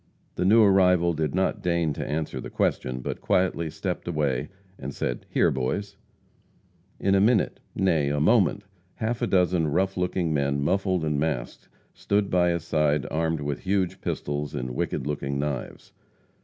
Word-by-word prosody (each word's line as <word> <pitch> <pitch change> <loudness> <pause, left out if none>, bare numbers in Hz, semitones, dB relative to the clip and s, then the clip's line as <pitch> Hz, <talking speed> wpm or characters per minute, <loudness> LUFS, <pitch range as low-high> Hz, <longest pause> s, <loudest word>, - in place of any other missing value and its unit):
The 90 - -1
new 110 +4 +6
arrival 90 -3 +4
did 80 -1 -2
not 95 0 0
deign 85 -3 +1
to - - -4
answer 75 +2 -3
the - - -7
question, 65 0 -1
but - - -5
quietly 90 -3 +1
stepped - - -4
away, 75 -5 -1 0.3
and 70 +1 -6
said: - - -3
"Here, - - +3
boys." 100 +11 -2 1.0
In 95 - +2
a 95 - +4
minute 110 0 +2 0.2
nay, 80 -7 +2
a 75 0 0
moment 100 +2 +3 0.3
half 115 +1 -2
a - - +1
dozen 90 -3 +2
rough 95 +6 0
looking 90 -2 0
men, 70 -1 0
muffled 95 +3 0
and 75 -2 0
masked, 70 -6 -3 0.2
stood 100 0 0
by 90 -1 +3
his 85 -2 -1
side, 75 -3 +1
armed 80 0 0
with 70 -1 -3
huge 95 -2 -1
pistols 75 0 -3
and 65 0 -3
wicked 60 - -2
looking 70 -1 -2
knives. 70 -3 -4
80 Hz, 165 wpm, -26 LUFS, 75-95 Hz, 1.0 s, new